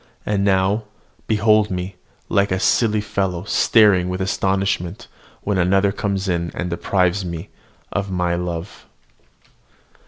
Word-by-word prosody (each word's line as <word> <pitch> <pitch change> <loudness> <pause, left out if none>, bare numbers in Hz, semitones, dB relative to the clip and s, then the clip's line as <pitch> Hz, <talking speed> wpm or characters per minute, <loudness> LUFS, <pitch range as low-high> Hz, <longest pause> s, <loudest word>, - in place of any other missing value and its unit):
And 100 -1 0
now, 100 +2 +2 0.4
behold 110 -1 +3
me 90 +1 -4 0.3
like 100 0 +1
a 95 - +1
silly 110 +1 +2
fellow, 95 -4 -2
staring 100 -3 +4
with 90 0 -3
astonishment 95 +1 -1 0.4
when 100 -2 0
another 95 +3 +3
comes 100 -1 -2
in, 85 -2 -1
and 90 0 -3
deprives 90 +2 +1
me 85 +1 -6 0.4
of 100 0 -2
my 90 -2 0
love. 85 +1 -5
95 Hz, 125 wpm, -21 LUFS, 90-100 Hz, 0.4 s, staring